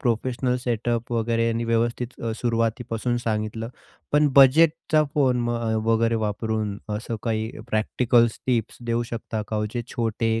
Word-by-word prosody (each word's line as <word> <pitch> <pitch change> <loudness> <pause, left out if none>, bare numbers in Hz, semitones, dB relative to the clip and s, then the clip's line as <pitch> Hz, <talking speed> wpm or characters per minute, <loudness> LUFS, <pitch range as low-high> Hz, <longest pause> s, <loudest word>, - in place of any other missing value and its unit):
Professional 125 +1 0
setup 120 0 -1
वगैरे 115 0 +1
आणि 115 +1 -1
व्यवस्थित 115 +2 -1 0.2
सुरुवातीपासून 115 0 -1
सांगितलं. 110 +1 -2 0.4
पण 150 0 +4
बजेटचा 155 +3 +5
फोन 125 -4 +2
अ, 115 -1 -1
वगैरे 115 0 +2
वापरून 105 -1 -2 0.2
असं 115 +1 -4
काही 110 -1 -1 0.2
प्रॅक्टिकल्स 115 +1 +2
टिप्स 120 -4 0
देऊ 115 0 +1
शकता 115 -2 -3
का 110 - -2
हो 105 - 0
म्हणजे 110 +3 -3
जे 120 - -10
छोटे 115 -1 0
115 Hz, 140 wpm, -24 LUFS, 110-120 Hz, 0.4 s, बजेटचा